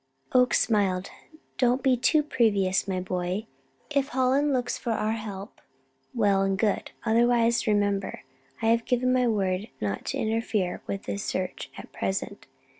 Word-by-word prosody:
Oakes 250 -1 +4
smiled. 195 -4 +1 0.5
"Don't 250 +1 +2
be 260 -2 +4
too 300 +5 +3
previous, 200 -9 +2
my 185 -1 -1
boy. 185 +3 -2 0.5
If 280 -2 +1
Hallen 265 +2 +2
looks 250 -2 0
for 235 - -2
our 215 0 0
help, 210 -2 -6 0.5
well 200 -4 +3
and 195 0 +1
good. 205 0 0 0.2
Otherwise, 235 +1 +3
remember, 205 -2 0 0.4
I 225 - +3
have 230 0 +2
given 255 0 +2
my 250 -1 +3
word 195 -2 0
not 100 -1 -3
to - - -2
interfere 220 -4 -1
with 195 - -4
his 200 - -3
search 185 -1 -3
at - - -10
present. 195 +1 -3
220 Hz, 150 wpm, -27 LUFS, 195-245 Hz, 0.5 s, Oakes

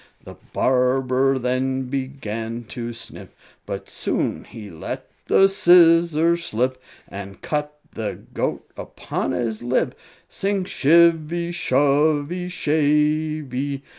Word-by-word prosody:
The - - -10 0.2
barber 130 +1 +2
then 130 +1 -1
began 120 -4 -4
to 120 +2 -5
snip, 115 - -10 0.3
But - - -5
soon - - -2
he 105 -3 -10
let 80 -1 -6 0.2
the 195 - +6
scissors 170 -2 +5
slip, 130 +2 -1 0.3
And 100 +1 -9
cut 150 0 -3 0.2
the 110 -2 -4 0.2
goat - - -2
upon - - -4
his 115 -3 -2
lip 125 +1 0 0.3
Sing 195 -1 -1
shivvy, 170 +1 +3
shovvy, 145 +3 +1
shavey! 150 -3 0
140 Hz, 105 wpm, -22 LUFS, 125-160 Hz, 0.3 s, the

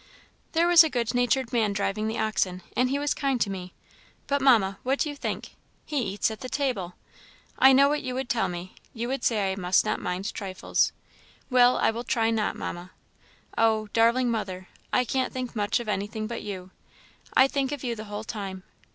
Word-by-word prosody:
There 335 +1 +3
was 345 -1 +9
a 320 - 0
good 235 -4 -1
natured 245 0 +1
man 220 -4 +2
driving 205 +2 -1
the 220 +1 -2
oxen, 190 -4 -1
and 250 +1 +2
he 275 - 0
was 290 0 0
kind 275 -3 0
to 205 - 0
me; 185 -1 -6 0.5
but, 280 0 0
Mamma, 215 -8 +4
what 265 +2 0
do 300 - 0
you 290 - -5
think? - - -4 0.4
he 290 -3 -1
eats 205 0 -1
at 220 - -7
the 255 - -6
table! 245 -12 -2 0.6
I 265 - +8
know 275 +1 +6
what 295 +1 0
you 255 - -4
would 260 0 -3
tell 235 -2 +1
me; 175 +1 -6 0.2
you 235 +1 -3
would 270 -1 -2
say 205 -4 +1
I - - -2
must 180 -1 +2
not - - -1
mind 180 +3 -3
trifles. 190 -3 0 0.6
Well, 250 0 +5
I - - +3
will 230 +2 -5
try 225 -1 +1
not, 220 -2 0
Mamma. 175 +1 -6 0.7
Oh! 220 -1 +2
darling 235 +2 +3
mother, 185 -5 -4 0.2
I 250 - +2
can't 260 +2 -1
think 255 -2 -5
much 205 0 +1
of 240 - -6
anything 210 +1 -2
but 230 +1 -5
you. 190 -3 -7 0.6
I 260 - +7
think 270 0 -1
of 290 -2 -5
you 240 -2 -2
the 215 0 -7
whole 210 0 -6
time. 195 -4 -6
225 Hz, 205 wpm, -26 LUFS, 200-255 Hz, 0.7 s, was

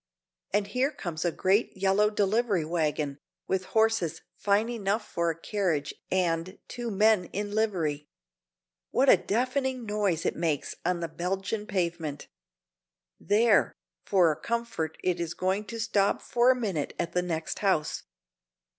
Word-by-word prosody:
And 205 +1 +2
here 250 +7 +1
comes 175 - -5
a 175 - +1
great 195 +5 +1
yellow 195 +2 +3
delivery 210 -3 +1
wagon, 150 -3 -1 0.3
with 190 -1 0
horses 220 -7 +1
fine 205 +2 +2
enough 215 -2 -1
for 170 0 0
a 165 0 -3
carriage 170 -8 -1 0.2
and 180 -1 0
two 240 -1 -5
men 210 -2 +3
in 205 +3 -4
livery. 170 -9 0 0.8
What 270 +1 +3
a - - +9
deafening 255 +2 -1
noise 205 -6 0
it - - 0
makes 160 -4 -1
on 175 0 0
the 170 - -1
Belgian 195 +6 -3
pavement! 170 -6 -2 0.9
There! 215 +2 +3 0.3
for 180 -5 +4
a - - -2
comfort 230 -9 -2
it 180 -1 +1
is 170 -1 -3
going 190 +3 0
to 230 +3 -7
stop 210 -3 +2
for 240 +1 +3
a 260 - +6
minute 190 -11 -2
at 170 - -2
the 180 - +1
next 165 -3 -3
house. 190 -7 +1
195 Hz, 145 wpm, -28 LUFS, 170-215 Hz, 0.9 s, a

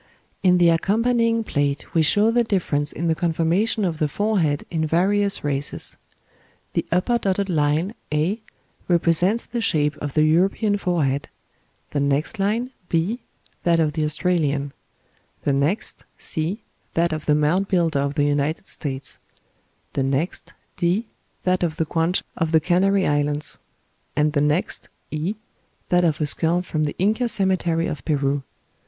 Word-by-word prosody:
In 180 -1 +5
the 175 -1 +5
accompanying 230 +6 +2
plate 145 -6 -2
we 165 - +4
show 205 +8 +4
the 240 +1 +3
difference 155 -9 0
in 170 - -3
the 165 - +3
conformation 175 +6 +1
of 165 -3 -2
the 155 - +2
forehead 170 -4 0
in 160 -2 0
various 195 +5 +1
races. 145 -1 -2 0.8
The - - -1
upper 210 +8 +2
dotted 195 -1 0
line, 155 +4 +1 0.2
A, 165 +9 0 0.5
represents 175 +5 +3
the 240 - -3
shape 150 -7 +1
of 145 -2 -5
the 155 - +4
European 195 +6 +2
forehead; 150 -8 0 0.6
the 145 - 0
next 140 +8 0
line, 225 +6 0 0.2
B, 175 +9 0 0.4
that 170 -1 +3
of 155 -2 +2
the 155 -1 -1
Australian; 150 -3 0 0.7
the 140 - +1
next, 150 +11 -1
C, 165 +8 -3 0.3
that 170 0 +2
of 155 -1 -5
the 150 - +4
Mound 160 +6 +2
Builder 170 -6 +1
of 140 +1 -1
the 145 - +2
United 145 +4 0
States; 135 -7 -6 0.7
the 140 - 0
next, 135 +6 -2 0.2
D, 185 +7 0 0.3
that 185 0 +1
of 165 -3 0
the 160 - +1
Guanche 165 +3 +1
of 160 -1 -1
the 160 - +5
Canary 190 +4 +2
Islands; 145 0 0 0.6
and 150 +1 +2
the 145 - +2
next, 150 +5 0 0.2
E, 160 +7 -2 0.5
that 180 0 +4
of 160 -3 +1
a 155 - +1
skull 165 +4 +1
from 155 -4 -1
the 145 - -3
Inca 220 +6 +1
cemetery 185 -5 +1
of 135 -5 -4
Peru. 140 -2 0
165 Hz, 155 wpm, -23 LUFS, 150-195 Hz, 0.8 s, In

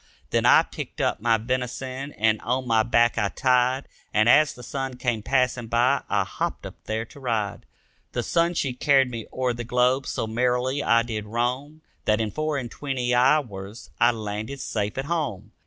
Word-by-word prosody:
Then - - +2
I - - +7
picked - - -8
up - - 0
my 115 0 +3
venison 130 +3 -3
and 110 0 +1
on 130 +2 -1
my 115 -2 +3
back 120 +1 +2
I 105 -2 +1
tied 130 +2 +1 0.2
And 110 +1 +3
as 150 +4 +6
the 125 - -11
sun 135 0 -4
came 120 -4 -1
passing 125 0 0
by 125 +4 +2
I - - +2
hopped - - -4
up - - -7
there 110 +1 -2
to 140 - -15
ride. 115 -6 -2 0.5
The - - -1
sun 170 +1 +1
she 135 -5 0
carried 135 0 +3
me 115 -2 -6
o'er 130 -1 -1
the 120 0 -5
globe, 125 +3 +1
so - - -2
merrily 125 +4 0
I 115 -3 +3
did 110 -3 -5
roam 125 +7 -2 0.2
That 105 0 +2
in 110 -2 -1
four 155 +2 -1
and 120 -4 -5
twenty 130 -4 -2
hours 120 -6 +1
I 120 - +6
landed 110 +3 -4
safe 105 -4 -3
at 135 - -2
home. 130 - -3
125 Hz, 190 wpm, -25 LUFS, 115-135 Hz, 0.5 s, I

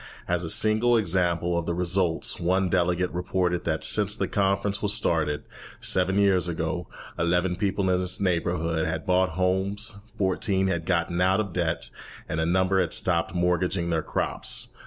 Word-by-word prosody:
As 90 0 0
a 80 - -4
single 110 +6 +3
example 90 -3 0
of 85 -1 -2
the 85 - -1
results, 90 -1 0
one 95 +2 +1
delegate 90 0 +1
reported 90 0 -1
that 80 -1 -1
since 105 -1 +3
the - - -2
conference 100 0 0
was 105 -1 +3
started, 75 -7 0 0.4
seven 95 +1 +2
years 95 -3 +3
ago, 80 0 -3 0.3
eleven 90 +2 +1
people 95 0 -1
in 90 - +2
his 90 0 -4
neighbourhood 85 -3 0
had 80 0 -3
bought 90 -2 +2
homes, 100 +3 0 0.2
fourteen 95 0 +1
had 85 -3 -2
gotten 85 -1 0
out 95 +2 +3
of 100 -5 -3
debt, 85 -2 -2 0.4
and 80 - -3
a 80 - 0
number 95 +2 +2
had 85 -3 -2
stopped 85 -1 0
mortgaging 90 0 0
their 80 -1 +1
crops. - - -2
90 Hz, 165 wpm, -25 LUFS, 85-95 Hz, 0.4 s, single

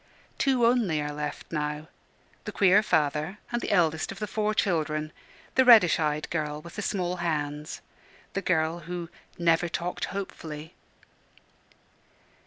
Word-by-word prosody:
Two 260 -3 +3
only 230 -10 +2
are 150 0 -2
left 150 0 -5
now 150 -1 -3 0.6
the - - -4
queer 200 +1 +5
father 155 0 0
and 240 0 -1
the - - -3
eldest 160 -5 +2
of 195 - -8
the 210 - -3
four 215 0 -1
children, 155 -6 0 0.4
the 260 - +5
reddish 220 -11 +7
eyed 150 -1 0
girl 150 -2 -2
with 170 +2 -12
the 210 - -3
small 180 -3 -1
hands, 150 -3 -3 0.5
the 195 - -1
girl 165 -2 +1
who 175 -2 -4 0.3
"never 170 0 +2
talked 175 +1 -3
hopefully." 160 -5 -6
170 Hz, 140 wpm, -27 LUFS, 150-195 Hz, 0.6 s, reddish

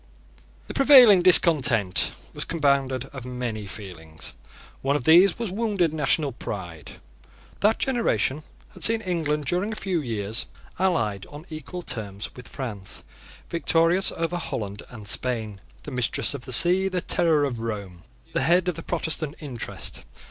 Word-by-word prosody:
The - - -8
prevailing 255 -9 +8
discontent 135 - +3 0.2
was - - -4
compounded 140 -5 0
of 135 -3 -7
many 120 -4 -5
feelings. 85 -6 -8 0.5
One 140 +1 +1
of 145 - -1
these 175 +6 +6
was 230 -5 -4
wounded 200 -6 0
national 150 -1 +1
pride. 90 - -7 0.7
That 215 +2 +3
generation 155 - 0 0.3
had - - -5
seen 225 0 +3
England, 155 -6 -2
during 180 +8 -1
a - - -4
few 185 -5 -1
years, 110 -4 -2 0.3
allied 115 - 0
on 145 +3 -11
equal 175 +3 -7
terms 105 -6 -4
with 125 - -11
France, 105 -8 -6 0.5
victorious 170 +2 +3
over 165 +1 -2
Holland 110 - -4
and 110 -4 -10
Spain, 110 -4 -1 0.2
the 150 - -8
mistress 125 +2 0
of 135 -4 -6
the 130 - -7
sea, 180 +8 +6
the 185 -2 -1
terror 160 -5 +2
of 125 -5 -4
Rome, 100 -6 -5 0.3
the - - 0
head 175 +6 +3
of 180 - +1
the 165 - -7
Protestant 160 -2 -1
interest. 130 -7 -6
145 Hz, 150 wpm, -25 LUFS, 115-175 Hz, 0.7 s, prevailing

